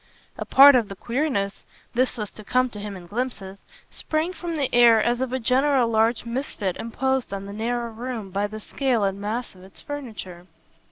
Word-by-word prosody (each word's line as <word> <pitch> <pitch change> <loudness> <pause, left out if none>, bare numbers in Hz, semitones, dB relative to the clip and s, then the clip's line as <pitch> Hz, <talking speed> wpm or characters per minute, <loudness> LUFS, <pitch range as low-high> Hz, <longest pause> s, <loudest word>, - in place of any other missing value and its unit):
A - - -5
part 280 +1 +9
of 240 -5 +2
the 195 - -7
queerness 235 -4 -2 0.3
this 250 +1 +1
was 210 -3 -4
to 215 - -12
come 255 +3 +1
to 210 - -8
him 205 -1 -6
in 175 - -11
glimpses 205 -2 -4 0.3
sprang 320 +3 -2
from 340 -3 -5
the 275 -3 -1
air 235 -2 +7
as 240 +3 +1
of 260 -2 -1
a 260 - -1
general 260 +1 +3
large 225 +1 +2
misfit 230 -6 -3
imposed 265 +2 -1
on 195 0 -5
the 200 - -8
narrow 235 +2 -2
room 225 -3 -6
by 200 +2 0
the 215 +1 -8
scale 245 0 0
and 195 0 -1
mass 225 +4 -3
of 185 - -17
its 190 - -15
furniture. 215 -11 -7
235 Hz, 200 wpm, -24 LUFS, 205-260 Hz, 0.3 s, part